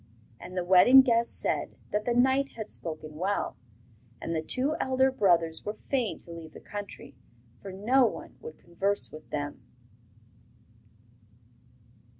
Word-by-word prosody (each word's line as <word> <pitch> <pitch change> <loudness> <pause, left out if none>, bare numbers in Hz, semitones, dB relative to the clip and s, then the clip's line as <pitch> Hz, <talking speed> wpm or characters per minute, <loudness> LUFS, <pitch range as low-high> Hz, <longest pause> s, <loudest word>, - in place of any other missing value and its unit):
And 185 +1 -9
the 180 - 0
wedding 190 +9 +8
guests 235 -2 +2
said - - -2 0.2
that 210 +1 -1
the 240 - 0
knight 265 +3 +2
had 220 -2 -7
spoken 155 -2 -6
well; 195 +4 -1 0.6
and 165 - -4
the 160 - 0
two 265 - +1
elder 260 0 +2
brothers 170 -9 +2
were 210 - -4
fain 255 -6 0
to 170 - -11
leave 165 -1 -10
the - - -10
country, 205 -7 -8 0.5
for 195 - -8
no 235 +7 +3
one - - -7
would 465 +1 -9
converse 195 +4 -1
with 155 0 -12
them. 145 -2 -4
205 Hz, 145 wpm, -28 LUFS, 170-255 Hz, 0.6 s, wedding